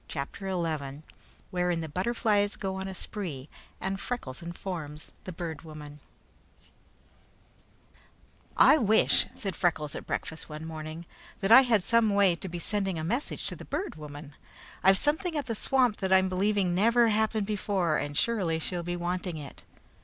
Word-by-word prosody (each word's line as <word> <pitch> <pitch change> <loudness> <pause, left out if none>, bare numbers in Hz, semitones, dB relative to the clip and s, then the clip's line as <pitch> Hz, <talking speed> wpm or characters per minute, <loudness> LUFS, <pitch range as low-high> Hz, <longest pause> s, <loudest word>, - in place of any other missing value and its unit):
CHAPTER 150 +7 -5
XI 155 -5 -3 0.5
Wherein 180 -2 0
the 160 - -4
Butterflies 205 +3 +1
Go 190 -2 -3
on 190 0 -4
a 190 - -6
Spree 165 -11 -5 0.3
and 195 +1 -2
Freckles 170 - -4
Informs 170 -3 -6
the 185 - -5
Bird 165 -3 -5
Woman 150 -2 -10 2.6
"I 310 - +7
wish," 220 -1 +4
said 195 -3 -4
Freckles 155 -4 0
at - - -7
breakfast 160 - -4
one 155 +1 -7
morning, 160 +1 -7 0.3
"that 195 +2 0
I 260 - +11
had 230 -7 +3
some 230 +1 +4
way 195 -4 +5
to 185 +2 -7
be 175 - -5
sending 195 0 -1
a 155 - -3
message 240 - -2
to - - -3
the - - -10
Bird 390 - -3
Woman. 145 -1 -9 0.5
I've 190 +1 +6
something 315 - +1
at 285 - -1
the 230 - -2
swamp 250 0 +2
that 190 -2 -2
I'm 190 0 +5
believing 190 -1 +1
never 230 +5 +4
happened 220 0 +1
before, 195 -6 0
and 145 0 -3
surely 190 -9 +1
she'll 175 +2 -3
be 175 +1 -3
wanting 175 0 -3
it." 145 -2 -9
185 Hz, 160 wpm, -29 LUFS, 160-210 Hz, 2.6 s, I